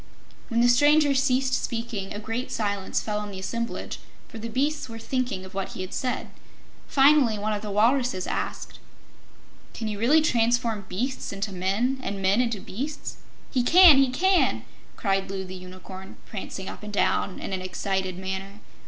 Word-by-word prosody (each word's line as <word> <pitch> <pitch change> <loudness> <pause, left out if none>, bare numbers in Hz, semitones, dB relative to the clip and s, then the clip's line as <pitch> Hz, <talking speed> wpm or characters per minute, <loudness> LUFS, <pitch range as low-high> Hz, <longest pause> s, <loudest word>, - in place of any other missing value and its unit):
When 235 -1 +1
the 240 - +5
stranger 290 +4 +5
ceased 265 -1 +2
speaking, 230 -6 -2
a - - -4
great 225 +4 -4
silence 200 -3 -1
fell 210 -1 -2
on 210 0 -5
the 195 - -7
assemblage, 230 +5 -4 0.3
for 225 - -9
the 230 +1 -5
beasts 280 +3 -1
were 225 - -7
thinking 245 -5 -2
of 190 - -12
what 195 0 -3
he - - -5
had 185 +1 -6
said. 255 -1 -2 0.6
Finally 270 -5 +5
one 210 +1 -1
of 205 - -3
the 210 - -5
walruses 225 -1 +2
asked: - - -4 1.0
"Can 225 - -4
you 210 -1 -4
really 285 +8 +5
transform 230 -5 +1
beasts 250 +8 -3
into 200 +1 -3
men, 200 +8 0
and 200 -5 -4
men 195 +4 +3
into 230 -4 -1
beasts?" 280 +11 -5 0.3
"He 255 - +2
can 330 +2 +8
he 270 -1 +4
can!" 370 +8 +2 0.3
cried 195 -2 0
Loo 190 -1 -4
the 185 - -8
Unicorn, 185 +1 -10
prancing 195 -2 -6
up - - -7
and 210 0 -7
down 200 -1 +1
in - - -5
an 185 - -2
excited 185 0 -2
manner. 190 +2 -5
220 Hz, 175 wpm, -26 LUFS, 195-255 Hz, 1.0 s, can